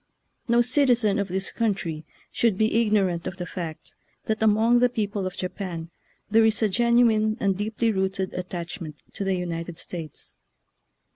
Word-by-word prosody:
No 235 0 +4
citizen 245 -5 +3
of 200 - -1
this 190 +1 -2
country 190 -9 -2 0.3
should 225 -5 +1
be 220 +2 +3
ignorant 195 -6 +1
of 185 - -5
the 180 - -4
fact 170 -4 -7 0.3
that 220 0 -1
among 220 +3 +4
the 250 0 +4
peo 225 -3 -1
ple 200 -2 -3
of 185 - -6
Japan 180 -3 -5 0.4
there 225 +2 +4
is 220 0 +2
a 215 - +3
genuine 230 -1 +3
and 195 -1 +1
deep 210 +2 -4
ly 230 - +5
rooted 190 -2 -1
attachment 170 -3 -5 0.2
to - - -3
the 195 -1 +1
United 170 -1 -4
States. 165 -4 -6
200 Hz, 165 wpm, -25 LUFS, 180-220 Hz, 0.4 s, ly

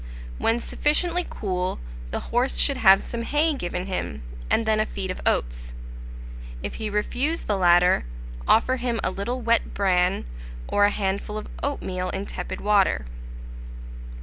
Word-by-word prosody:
When 230 +1 +2
sufficiently 340 +7 0
cool, 185 -2 -2 0.3
the - - -2
horse 245 +3 +2
should 280 -2 +3
have 195 -5 +6
some 235 - -4
hay 295 +6 +2
given 180 -7 -3
him, 75 - -4 0.3
and 230 - +2
then 220 -1 +2
a 215 - +2
feed 190 -2 -4
of - - -6
oats: - - -1 0.9
if - - -4
he 215 - -1
refuse 245 +10 -1
the 210 - 0
latter, 175 - +5 0.4
offer 255 +3 +4
him 240 -2 -1
a - - 0
little 240 +6 -3
wet 235 0 +1
bran, 185 -2 +2 0.4
or 205 - +4
a - - +5
handful 200 +1 -2
of 215 - -5 0.2
oatmeal 185 -10 -2
in 195 +1 -3
tepid 180 - -5
water. 200 - +3
205 Hz, 150 wpm, -25 LUFS, 185-240 Hz, 0.9 s, have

